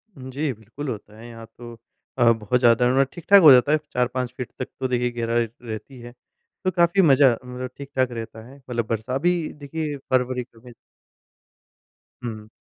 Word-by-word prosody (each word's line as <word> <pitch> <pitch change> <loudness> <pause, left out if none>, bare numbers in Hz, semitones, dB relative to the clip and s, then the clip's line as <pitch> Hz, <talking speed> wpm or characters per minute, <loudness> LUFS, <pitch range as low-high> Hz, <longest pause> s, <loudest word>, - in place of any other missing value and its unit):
जी, 135 +2 -4
बिल्कुल 115 +7 -8
होता 105 -1 -8
है। 115 - -11
यहाँ 115 -1 -10
तो 120 -1 -10 0.4
अ, 120 -2 +5
बहुत 115 +2 0
ज़्यादा 125 +2 +4
ठीक-ठाक 175 +8 +4
हो 155 -5 +9
जाता 130 +3 +6
है। 155 - +5 0.2
4-5 125 0 -1
फीट 125 - -6
तक 130 - -3
तो 130 - -1
देखिए 125 -1 0
गहराई 115 0 0
रहती 120 +3 -8
है। 120 0 -11 0.5
तो 185 - +1
काफ़ी 170 +2 +3
मज़ा 140 -5 +6
मतलब 125 +1 -7
ठीक-ठाक 135 -2 -2
रहता 115 -1 -8
है। 135 +2 -14
मतलब 120 -4 -4
बरसा 115 +3 -3
अभी 175 +6 +2 0.3
देखिए 150 0 -4
फ़रवरी 125 0 +1
जो 115 - -19
है 120 - -11 1.5
हुँ। 110 -3 -6
125 Hz, 170 wpm, -23 LUFS, 115-135 Hz, 1.5 s, हो